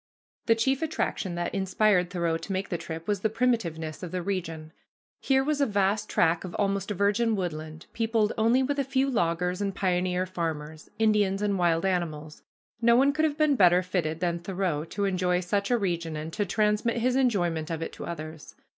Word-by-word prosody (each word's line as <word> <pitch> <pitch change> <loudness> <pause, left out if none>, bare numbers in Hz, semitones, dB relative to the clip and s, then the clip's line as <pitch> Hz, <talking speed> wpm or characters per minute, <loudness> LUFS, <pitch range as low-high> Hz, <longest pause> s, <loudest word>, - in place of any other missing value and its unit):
The 230 - +5
chief 265 +5 +1
attraction 295 - -2
that 175 0 -3
inspired 190 -1 +2
Thoreau 170 -3 0
to 165 - -6
make 190 +1 -2
the 175 - -1
trip 165 0 -7
was 205 -2 0
the 220 - 0
primitiveness 200 -10 -1
of 180 - -5
the 180 +1 -3
region. 165 -5 -4 0.5
Here 265 -1 +2
was 295 0 0
a 280 - +3
vast 205 +1 0
tract 165 0 +2
of 180 -2 -7
almost 200 -1 0
virgin 210 +3 +1
woodland, 160 -4 -5
peopled 225 -2 +1
only 230 +4 +3
with 285 +2 -1
a - - +2
few 270 0 +1
loggers 180 -2 0
and 200 -1 -2
pioneer 180 -1 0
farmers, 160 -4 -5
Indians, 210 -2 +2
and 205 -1 +1
wild 170 0 +2
animals. 160 -5 -2 0.4
No 235 0 +5
one 275 +3 +4
could 310 +1 +2
have 300 -1 -1
been 305 -2 +3
better 180 -4 +5
fitted 170 -3 -2
than 170 -1 0
Thoreau 175 -4 -2
to 200 +4 -2
enjoy 180 -2 +1
such 200 +3 -1
a 245 - +3
region 170 -6 -2
and 155 +2 -6
to 205 -2 -1
transmit 210 +4 +1
his 250 +2 +1
enjoyment 175 -11 +1
of 165 -1 -3
it - - -6
to - - -7
others. 155 -2 -7
190 Hz, 195 wpm, -27 LUFS, 170-220 Hz, 0.5 s, The